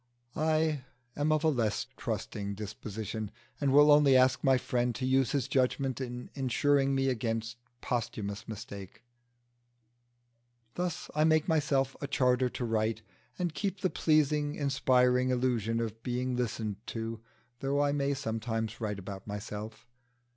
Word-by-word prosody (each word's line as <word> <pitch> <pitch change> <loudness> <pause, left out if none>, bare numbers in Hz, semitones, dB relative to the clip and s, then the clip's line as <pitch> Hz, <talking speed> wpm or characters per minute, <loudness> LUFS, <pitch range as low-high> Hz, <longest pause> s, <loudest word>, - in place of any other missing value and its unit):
I 155 -1 +1 0.3
am 145 +2 +1
of 155 0 +2
a - - +4
less 115 -8 0
trusting 100 0 -4
disposition, 110 0 -5 0.3
and 140 -2 +2
will 145 +2 +7
only 145 -3 +7
ask 130 0 +3
my 135 -2 +5
friend 120 -1 0
to 130 - -2
use 130 -1 +3
his 140 -5 0
judgment 130 0 0
in 125 -1 -6
insuring 135 +1 +2
me 135 0 +1
against 115 -2 -1 0.2
posthumous 115 -3 -3
mistake. 100 -3 -8 1.7
Thus 175 -2 -3
I 150 - +2
make 155 -1 +3
myself 145 -5 +1
a 140 - -2
charter 130 -2 +2
to 125 - -4
write, 110 0 0 0.3
and 175 -3 -1
keep 190 +3 -3
the 185 - +1
pleasing, 150 -1 +2
inspiring 130 -3 +3
illusion 120 -3 +1
of 115 -1 -4
being 125 +1 -1
listened 110 -4 -2
to, 115 0 -4 0.4
though 140 +1 0
I 145 - +2
may 140 0 0
sometimes 115 -3 -3
write 105 -2 -2
about 100 0 -8
myself. 105 +1 -6
125 Hz, 140 wpm, -31 LUFS, 110-145 Hz, 1.7 s, will